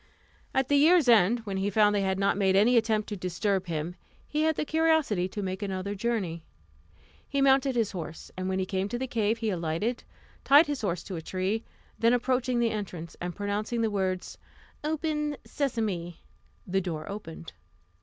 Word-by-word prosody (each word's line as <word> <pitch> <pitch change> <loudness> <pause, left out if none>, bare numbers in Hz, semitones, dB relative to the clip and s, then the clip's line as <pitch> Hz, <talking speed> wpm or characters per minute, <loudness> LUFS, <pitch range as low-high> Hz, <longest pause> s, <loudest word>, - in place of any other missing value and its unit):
At 265 -1 +1
the 285 - +3
year's 320 0 +5
end, 230 0 +5
when 200 -3 -4
he 195 +1 0
found 210 +1 +4
they 205 - +1
had 190 -1 0
not 200 0 +2
made 190 -1 +2
any 220 +6 +5
attempt 220 -2 +2
to 210 - -3
disturb 185 +1 -1
him, 165 +1 -3 0.3
he 300 - -1
had 315 0 +2
the - - -2
curiosity 315 - +2
to 205 +2 -5
make 190 +1 -3
another 195 0 -3
journey. 195 -6 -2 0.9
He 280 - -1
mounted 270 -1 +4
his 225 -4 +1
horse, 165 -4 -7
and 185 0 -3
when 190 - 0
he 190 - 0
came 190 +1 -2
to 240 - -2
the 260 - -2
cave 225 -3 0
he 225 -2 -1
alighted, 175 +7 -2 0.4
tied 290 +4 +7
his 290 -3 -3
horse 180 -5 -2
to 185 - -6
a - - -5
tree, 190 +6 -2 0.4
then 230 +1 +4
approaching 250 0 +1
the 235 -1 +2
entrance, 180 -6 -5
and 175 0 -4
pronouncing 210 +3 -2
the 225 -1 +1
words, 190 -2 -2 0.4
"Open, 300 -1 -1
Sesame!" 210 - -2 0.4
the 190 +1 0
door 160 -4 -4
opened. 170 -5 -8
205 Hz, 185 wpm, -28 LUFS, 185-245 Hz, 0.9 s, tied